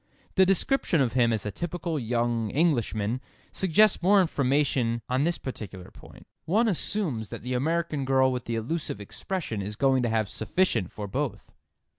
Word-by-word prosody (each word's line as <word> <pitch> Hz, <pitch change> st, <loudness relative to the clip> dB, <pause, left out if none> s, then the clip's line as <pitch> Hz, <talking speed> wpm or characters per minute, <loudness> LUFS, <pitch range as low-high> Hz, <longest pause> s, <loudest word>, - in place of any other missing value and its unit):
The 190 Hz, -1 st, +5 dB
description 195 Hz, -, +2 dB
of 130 Hz, -4 st, +1 dB
him 120 Hz, -2 st, +3 dB
as 110 Hz, -2 st, -1 dB
a 105 Hz, -, -2 dB
"typical 170 Hz, -, -3 dB
young 120 Hz, -2 st, 0 dB
Englishman" 120 Hz, -6 st, 0 dB, 0.3 s
suggests 190 Hz, +3 st, +3 dB
more 200 Hz, +3 st, +5 dB
information 135 Hz, -, +1 dB
on 130 Hz, +3 st, +1 dB
this 170 Hz, 0 st, +1 dB
particular 100 Hz, -8 st, -8 dB
point. -, -, -15 dB, 0.2 s
One 215 Hz, +8 st, +2 dB
assumes 165 Hz, -, -1 dB
that -, -, -8 dB
the 125 Hz, +1 st, -3 dB
American 155 Hz, +2 st, 0 dB
girl 130 Hz, 0 st, +3 dB
with 125 Hz, -1 st, -4 dB
the 115 Hz, -, -2 dB
elusive 120 Hz, +1 st, -3 dB
expression 115 Hz, -, -4 dB
is 105 Hz, +2 st, -5 dB
going 135 Hz, +2 st, +3 dB
to 120 Hz, -, 0 dB
have 110 Hz, -2 st, +1 dB
sufficient 110 Hz, -, 0 dB
for 105 Hz, -, -6 dB
both. 115 Hz, 0 st, -4 dB
130 Hz, 165 wpm, -27 LUFS, 115-170 Hz, 0.3 s, The